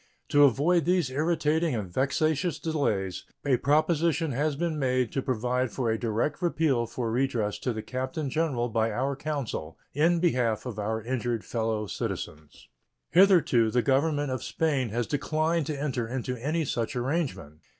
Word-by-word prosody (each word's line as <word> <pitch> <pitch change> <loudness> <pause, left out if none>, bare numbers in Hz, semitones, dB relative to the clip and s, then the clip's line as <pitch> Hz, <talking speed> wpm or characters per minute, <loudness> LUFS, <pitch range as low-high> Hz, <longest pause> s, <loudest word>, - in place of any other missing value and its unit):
To 145 0 +6
avoid 155 +6 +3
these 175 -6 +2
irritating 155 +1 +1
and 105 -4 -3
vexatious 155 - +1
delays, 110 - -1 0.2
a 135 -3 +3
proposition 155 +3 +2
has 145 +4 0
been 160 0 -2
made 130 -3 +1
to 135 - -1
provide 125 -1 -1
for 120 0 -1
a 110 - -1
direct 120 - -1
appeal 155 -9 +1
for 115 0 -3
redress 115 -5 0
to 125 - -1
the 110 -2 -5
Captain 130 +4 -3
General 135 -4 0
by 115 -1 +1
our 135 +3 -1
consul 135 - -4 0.2
in 165 +4 +3
behalf 125 -11 +1
of 115 -4 -5
our 110 +1 -2
injured 120 -2 -2
fellow 110 -2 -1
citizens. 75 -5 -6 0.4
Hitherto 170 - +5
the 125 +2 +1
Government 145 +1 +1
of 130 - -2
Spain 140 -7 0
has 120 +3 -1
declined 155 +3 0
to 150 -3 -3
enter 130 -5 -2
into 125 +1 -3
any 150 +7 -1
such 120 -1 -2
arrangement. 125 - -2
130 Hz, 160 wpm, -27 LUFS, 115-155 Hz, 0.4 s, To